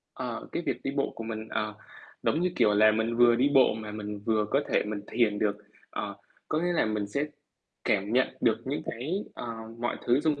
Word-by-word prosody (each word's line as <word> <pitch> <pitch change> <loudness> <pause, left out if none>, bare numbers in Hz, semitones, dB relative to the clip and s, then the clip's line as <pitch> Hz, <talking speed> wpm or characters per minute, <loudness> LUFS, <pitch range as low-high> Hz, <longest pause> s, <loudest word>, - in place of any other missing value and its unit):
Ờ, - - -4
cái - - -1
việc - - 0
đi 135 - 0
bộ 140 - +1
của 115 - -6
mình, 110 -1 -5
ờ, 105 -1 -2 0.5
giống 160 - +2
như, 180 +1 +2
kiểu 105 - +4
là, 110 +1 +7
mình 110 +2 0
vừa 120 0 +7
đi 135 +4 +3
bộ 130 -2 +6
mà 110 -1 -6
mình 105 -1 -5
vừa 110 -1 +3
có 140 - +4
thể - - +3
mình 105 -1 -3
thiền 110 -3 +2
được. 105 -1 +1 0.3
Ờ, - - -4 0.3
có 155 - +1
nghĩa 175 +2 +1
là 170 - +3
mình 105 -1 -1
sẽ 140 +8 -1 0.6
cảm 100 +1 +1
nhận 130 +1 +4
được 110 -2 +3
những 140 +3 -2
cái, 130 +9 -3 0.2
ờ, - - -6 0.3
mọi 120 +1 -1
thứ 120 +3 +4
xung 150 -2 +1
115 Hz, 225 wpm, -29 LUFS, 105-135 Hz, 0.6 s, là